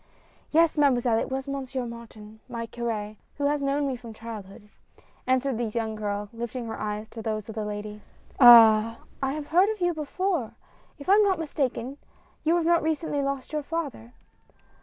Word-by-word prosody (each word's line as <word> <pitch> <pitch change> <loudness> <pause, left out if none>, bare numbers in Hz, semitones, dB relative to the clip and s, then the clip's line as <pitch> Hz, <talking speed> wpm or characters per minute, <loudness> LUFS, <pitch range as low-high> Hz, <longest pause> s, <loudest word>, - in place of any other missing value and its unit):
" - - -32
Yes, 325 -1 +3
Mademoiselle, 245 -5 +3
it - - -3
was 265 +1 -3
Monsieur 265 -2 -3
Martin, 220 -2 -11
my 235 -1 -4
cur^, 220 -3 -4 0.2
who 285 - -1
has 290 0 +1
known 280 +1 0
me 270 -2 -1
from 235 -2 -10
childhood," 215 -2 -9 0.6
answered 260 -1 +1
the 240 - 0
young 220 0 -2
girl, 205 -1 -3
lifting 235 +1 -5
her 225 - -6
eyes 210 +1 -4
to 225 - -8
those 215 -2 -3
of - - -5
the 215 0 -3
lady. 210 0 -6 0.4
"Ah! 230 -2 +8 0.2
I 270 0 0
have 300 -1 -6
heard 365 +5 +4
of 435 -1 -3
you 350 -1 +1
before. 315 - -2 0.4
If 280 - -11
I 385 - +6
am 420 +1 +6
not 390 -3 +2
mistaken 280 -4 -3 0.4
you 325 +2 +3
have 340 0 +3
recently 315 -2 -1
lost 275 0 -3
your 305 - 0
father 285 -7 -5
250 Hz, 180 wpm, -26 LUFS, 220-295 Hz, 0.6 s, Ah